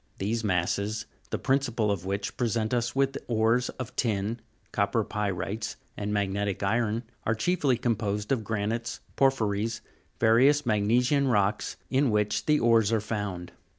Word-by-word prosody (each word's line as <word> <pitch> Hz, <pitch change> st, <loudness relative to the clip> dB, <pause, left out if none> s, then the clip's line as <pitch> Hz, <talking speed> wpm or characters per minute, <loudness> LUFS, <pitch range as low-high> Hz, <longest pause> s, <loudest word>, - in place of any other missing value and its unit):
These 110 Hz, +4 st, -1 dB
masses, 100 Hz, +3 st, 0 dB, 0.2 s
the -, -, -1 dB
principal 120 Hz, -6 st, +1 dB
of 95 Hz, -3 st, -3 dB
which 100 Hz, +1 st, -2 dB
present 115 Hz, -1 st, 0 dB
us 120 Hz, 0 st, 0 dB
with 135 Hz, 0 st, +1 dB
ores 115 Hz, +2 st, +2 dB
of 130 Hz, -, -6 dB
tin, 110 Hz, -1 st, 0 dB, 0.3 s
copper 100 Hz, +2 st, +1 dB
py'rite's, 105 Hz, +1 st, -3 dB, 0.2 s
and 105 Hz, 0 st, -3 dB
magnetic 100 Hz, -1 st, -1 dB
iron, 115 Hz, +3 st, +1 dB, 0.2 s
are 110 Hz, -, +1 dB
chiefly 140 Hz, 0 st, +1 dB
composed 105 Hz, -3 st, -1 dB
of 125 Hz, -5 st, +1 dB
granites, 110 Hz, +2 st, -2 dB
porphyries, 115 Hz, -4 st, +1 dB, 0.4 s
various 130 Hz, +6 st, +5 dB
mag 105 Hz, -3 st, +1 dB
nesian 125 Hz, +5 st, +3 dB
rocks, 105 Hz, -1 st, +1 dB
in 135 Hz, 0 st, +3 dB
which 105 Hz, -1 st, 0 dB
the 150 Hz, -1 st, +4 dB
ores 115 Hz, -2 st, +4 dB
are 115 Hz, -, +3 dB
found. 105 Hz, -5 st, -4 dB
110 Hz, 145 wpm, -28 LUFS, 105-120 Hz, 0.4 s, various